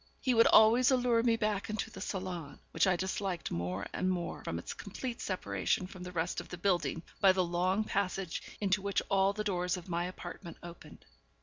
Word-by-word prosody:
He 255 - +1
would 230 -1 +6
always 230 +3 +7
allure 245 -3 +3
me 230 -1 +3
back 210 -2 -1
into 215 0 -3
the 190 - -9
salon, 185 -7 -5
which - - +3
I 185 - +4
disliked 190 -1 -2
more 90 +3 -2
and 185 - 0
more 180 -2 -3
from - - -3
its - - -5
complete 250 -3 -6
separation 100 - -1
from 185 0 -10
the 180 0 -6
rest 170 -1 -1
of - - -14
the 180 - -6
building 175 -4 0 0.2
by 195 -1 +6
the 185 -1 +2
long 180 +4 +1
passage 195 -4 -2 0.2
into 195 -1 +1
which 200 0 0
all 195 0 +4
the 210 +1 -3
doors 180 -3 0
of 180 +1 -10
my 170 0 0
apartment 175 -1 -8
opened. 170 0 -11
185 Hz, 200 wpm, -32 LUFS, 175-205 Hz, 0.2 s, always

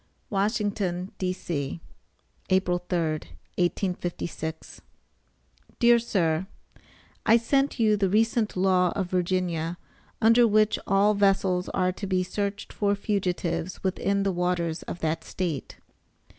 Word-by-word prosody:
WASHINGTON, 200 -3 -1
D.C., 170 -6 -3 0.7
April 185 -2 +2
3, 180 - +1 0.6
1856. 175 -3 -3 1.0
DEAR 235 -1 +5
SIR: 180 -6 0 0.8
I 225 - +6
sent 275 +4 +1
you 215 -2 +4
the 195 -2 +1
recent 220 +1 +1
law 180 -1 +3
of 185 -3 -2
Virginia, 175 -2 -1 0.4
under 230 +2 +6
which 215 0 +3
all 200 +2 +4
vessels 195 -3 +2
are 185 -1 +1
to 195 +2 -6
be 185 -1 +1
searched 200 +2 -4
for 205 -1 +1
fugitives 180 -4 -2
within 195 +1 0
the 195 - +1
waters 175 -2 -1
of 175 - -6
that 160 +1 -1
State. 170 -7 -4
185 Hz, 115 wpm, -26 LUFS, 175-205 Hz, 1.0 s, I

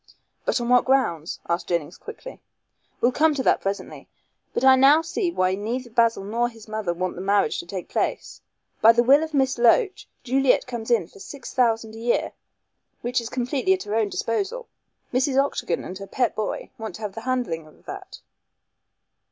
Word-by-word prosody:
"But - - +1
on 240 - -3
what 250 0 +4
grounds?" 180 - +1
asked 170 0 -1
Jennings 170 -1 -2
quickly. 460 +2 -10 0.6
"We'll 245 - +4
come 305 +3 +3
to 265 - -1
that - - +3
presently. 195 +1 -5 0.4
But - - -2
I 265 0 +8
now 280 +5 +6
see 350 +3 -1
why 185 - +1
neither 235 +5 -4
Basil 230 -3 +2
nor 235 +4 0
his 225 -2 -15
mother 215 -4 -2
want 185 +2 -2
the 180 - -7
marriage 200 -4 +1
to 170 - -7
take 185 0 -6
place. - - -3 0.4
By 225 +1 +8
the 240 +1 +3
will 275 +4 +6
of 315 -2 -5
Miss 265 -2 +1
Loach 380 - +3 0.2
Juliet 265 +1 +2
comes 240 -2 -6
in 220 -8 +2
for - - -17
six 275 +6 -9
thousand 225 -3 +1
a 225 - -9
year, 235 +1 0 0.7
which 245 +1 0
is 230 - -6
completely 260 +8 0
at 380 - -2
her 205 - -5
own 220 -2 +1
disposal. 400 - -2 0.5
Mrs. 265 +2 +1
Octagon 275 -10 0
and 185 +1 -7
her 195 - -8
pet 250 +3 0
boy 215 - -4
want 220 -1 -6
to - - -11
have 205 -2 -4
the 225 - -7
handling 225 -11 -2
of 155 - -21
that. - - -9
235 Hz, 195 wpm, -24 LUFS, 200-265 Hz, 0.7 s, I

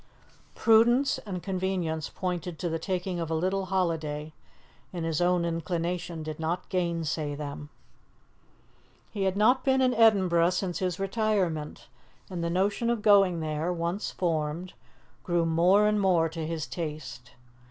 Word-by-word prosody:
Prudence 240 +4 +4
and 180 -3 -5
convenience 180 -5 -2
pointed 180 -2 -4
to 175 - -2
the 165 0 -2
taking 180 0 -3
of 165 -2 -3
a 160 - 0
little 190 +4 0
holiday, 160 -5 -2 0.6
and 175 -3 -4
his 165 0 -1
own 175 -1 +2
inclination 170 0 -3
did 155 0 -6
not 165 +3 -2
gainsay 165 -4 -1
them. 145 0 -7 1.4
He 200 -3 -2
had 190 0 0
not 245 +5 +4
been 265 -1 +3
in 255 -1 +3
Edinburgh 190 -7 +4
since 180 -1 -2
his 185 -1 -2
retirement, 195 -6 -1 0.4
and 175 -2 -3
the 170 - 0
notion 200 +6 0
of 235 -3 -1
going 195 -5 +5
there, 155 +2 -2
once 170 +3 -2
formed, 165 +1 -2 0.5
grew 175 -1 +1
more 175 +6 +4
and 210 -1 +2
more 175 -4 +3
to 160 -1 -5
his 160 -2 -3
taste. 150 -6 -6
175 Hz, 145 wpm, -28 LUFS, 160-195 Hz, 1.4 s, going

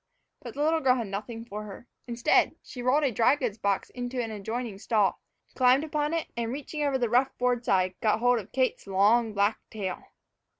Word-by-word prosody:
But - - -9
the 290 - -1
little 320 +1 +2
girl 260 -4 +3
had 235 -3 -2
nothing 215 +4 -6
for 210 -2 -6
her. 210 +4 -10 0.2
Instead, 235 -1 +2
she 250 - -8
rolled 260 +5 +2
a 275 - +2
dry 235 +5 +4
goods 240 -7 -3
box 200 -2 -1
into 245 0 -4
an 230 -2 -2
adjoining 220 0 -5
stall, 210 -2 +1 0.3
climbed 255 +2 +4
upon 300 -1 -1
it, 330 - -1
and, 235 -1 -2
reaching 295 +3 -5
over 280 -2 +1
the 245 -2 0
rough 250 +4 +1
board 245 -1 +1
side, 185 -4 +2
got 215 -1 +2
hold 245 +1 +3
of 200 - -10
Kate's 260 -5 -1
long 210 +4 +3
black 205 +2 +2
tail. 195 -5 -5
240 Hz, 205 wpm, -27 LUFS, 210-255 Hz, 0.3 s, dry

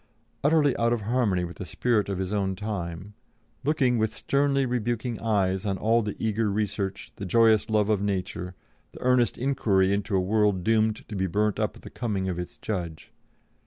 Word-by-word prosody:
Utterly 145 -2 +4
out 115 0 +2
of 120 - -1
harmony 105 -5 +1
with 85 0 -6
the - - -5
spirit 110 -5 0
of 100 - -2
his 95 +1 -3
own 95 -2 0
time, 95 -2 -5 0.5
looking 130 -4 +2
with 110 0 0
sternly 140 -1 +1
rebuking 120 -1 -2
eyes 95 -4 +1
on 100 -3 -1
all 115 +4 +2
the 105 -2 -4
eager 110 0 0
research, 100 0 -2
the - - -7
joyous 110 +2 +4
love 105 -2 +2
of 105 -2 +1
nature, 90 -2 -3 0.4
the - - -12
earnest 125 -3 +3
inquiry 105 -8 +2
into 100 0 -1
a - - +4
world 100 -1 +1
doomed 110 0 +1
to 105 - -6
be 95 -1 0
burnt 105 +3 0
up - - -1
at - - -14
the - - -10
coming 100 -6 -2
of 90 -2 -2
its 90 - -6
Judge. 85 -7 -5
105 Hz, 190 wpm, -26 LUFS, 95-115 Hz, 0.5 s, Utterly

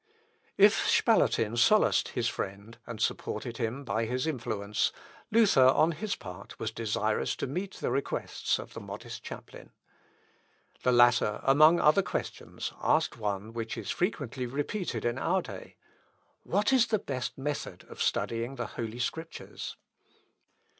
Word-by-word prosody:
If - - +5
Spalatin 115 0 +3
solaced 215 - +4
his 120 -1 -1
friend, 100 +1 -5
and 120 -3 -6
supported 115 +1 -2
him 120 +3 -2
by 110 +1 0
his 125 +4 -1
influence, 105 -8 -1 0.4
Luther 205 - +5
on 155 +5 +4
his 200 +6 -3
part 90 +1 -10
was 110 - -3
desirous 110 -1 -1
to - - -3
meet 185 +8 -4
the - - -2
requests 135 +2 -1
of - - -9
the - - -6
modest - - -8
chaplain. - - -10 1.1
The 125 - +3
latter, 120 -3 +4
among 155 +5 +6
other 155 +6 +5
questions, - - -5
asked - - +2
one 105 0 -3
which 115 0 -4
is 105 -3 -4
frequently 140 - -2
repeated 145 - -3
in 120 +2 0
our 185 +6 +1
day, - - -9 0.7
"What 210 +6 +1
is 245 -3 +5
the 220 - +2
best 130 -10 -4
method 145 +2 -4
of - - -9
studying 115 +3 -1
the 120 -2 -3
Holy 115 +1 -5
Scriptures?" 160 +7 -5
125 Hz, 140 wpm, -29 LUFS, 115-155 Hz, 1.1 s, among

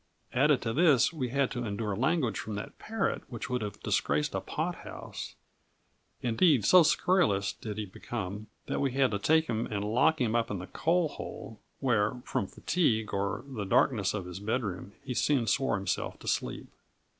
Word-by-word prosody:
Added 140 +1 +3
to 115 - -1
all - - -1
this, 155 -2 +4
we 130 -6 -2
had 140 +1 +1
to 120 -2 -3
endure 105 -1 -2
language 130 - +1
from 110 - -5
that 100 - -7
parrot 225 +1 -1
which 120 0 -6
would 125 -1 0
have 105 -1 -5
disgraced 75 +1 +1
a - - -1
pothouse; - - -5 0.9
indeed, 125 - +3
so 185 - +8
scurrilous 110 - +2
did 105 -2 -7
he 105 - -2
become, 105 +1 -6 0.2
that - - -2
we 135 -3 0
had 135 -3 +3
to 100 - -1
take 160 +8 +3
him 115 -4 -2
and 105 -1 -3
lock 125 +9 +3
him 120 -3 +1
up 115 -1 +1
in 105 - -2
the 90 - -6
coal 170 - +1
hole, 110 -6 -8 0.2
where, 115 -4 +2
from 100 - -1
fatigue, 110 - 0
or 100 +1 -1
the 130 -7 -5
darkness 100 +1 +2
of 100 -4 -4
his 90 +1 -7
bedroom, 100 -3 -3
he 130 -2 -4
soon 130 -1 +2
swore 135 0 +1
himself 100 -1 -2
to - - -12
sleep. - - -1
115 Hz, 185 wpm, -30 LUFS, 105-135 Hz, 0.9 s, so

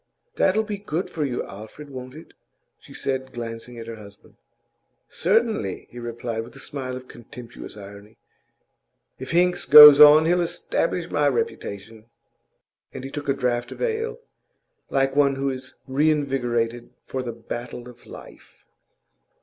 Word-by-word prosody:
'That'll 215 - +2
be 205 -2 -5
good 185 -3 -4
for 160 - -3
you, 130 -4 -2
Alfred, 110 +9 -11
won't 130 0 -9
it?' 160 - -13 0.5
she - - -17
said, 130 -1 -4
glancing 120 0 -7
at 115 - -8
her 115 0 -8
husband. 100 -1 -15 0.7
'Certainly,' 205 - 0
he 120 - -9
replied, 120 -1 -5
with 115 +1 -14
a - - -12
smile 130 -3 -6
of 130 0 -9
contemptuous 120 -2 -11
irony. 100 +1 -12 1.0
'If 130 - -7
Hinks 180 +1 +2
goes 150 -1 +11
on, 150 +1 +9
he'll 175 +2 +2
establish 170 - -2
my - - +2
reputation.' 110 - -4 0.9
And - - -8
he 135 - -7
took 145 -1 -6
a - - +4
draught 125 -2 -2
of - - -15
ale, 455 0 -2 0.7
like 135 0 0
one 140 -1 +3
who 135 0 -1
is 130 0 -8
reinvigorated 130 -5 0 0.2
for 130 - -4
the 120 -2 -5
battle 120 +1 -8
of 120 -1 -15
life. - - -14
130 Hz, 150 wpm, -23 LUFS, 120-150 Hz, 1.0 s, goes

